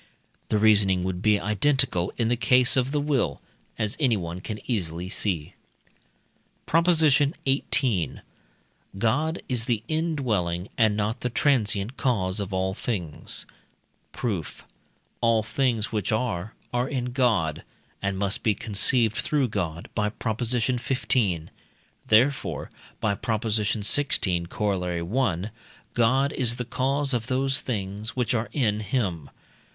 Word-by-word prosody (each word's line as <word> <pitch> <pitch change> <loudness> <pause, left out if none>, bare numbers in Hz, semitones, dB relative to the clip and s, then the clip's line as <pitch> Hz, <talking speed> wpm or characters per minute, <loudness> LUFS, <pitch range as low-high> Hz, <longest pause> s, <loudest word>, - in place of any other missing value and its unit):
The 110 - +2
reasoning 100 -4 +4
would 90 -1 -3
be 105 -1 +3
identical 105 -3 +1
in 115 - +1
the 120 - +2
case 125 +2 +4
of 130 0 +1
the 150 - +1
will, 145 -3 0 0.4
as 105 -2 -1
anyone 95 - 0
can 105 +2 -5
easily 90 -6 -3
see. 90 -7 -2 1.1
PROP. 165 +2 +2
XVIII. 140 - +2 0.8
God 150 - 0
is 120 -3 -2
the 115 -4 -1
indwelling 120 - -1
and 110 -3 +3
not 105 +1 -1
the 125 - -1
transient 115 -3 +1
cause 100 -7 0
of 100 -1 -4
all 95 0 0
things. 95 -8 -3 0.7
Proof. 100 - -4 0.6
All 115 -2 +3
things 115 -2 0
which 105 -3 -1
are, 110 -4 -2 0.2
are 125 +1 0
in 125 -3 -2
God, 110 - +1 0.4
and 100 -1 -1
must 100 +1 0
be 110 -2 +2
conceived 115 +1 +3
through 140 -5 +1
God 85 -5 -3
(by 105 -1 0
Prop. 110 0 -4
xv.), 120 - 0 0.6
therefore 125 +6 +2 0.3
(by 100 - +1
Prop. 110 +2 -2
xvi., 105 -3 +1
Coroll. 90 +1 -1
i.) - - -12 0.4
God 130 +5 +2
is 120 -3 +1
the 125 0 -4
cause 135 +3 0
of 120 -1 -1
those 135 +1 +1
things 105 -1 -4
which 125 -2 0
are 115 -1 -1
in 110 -7 +1
him. 100 - -2
110 Hz, 130 wpm, -25 LUFS, 100-130 Hz, 1.1 s, reasoning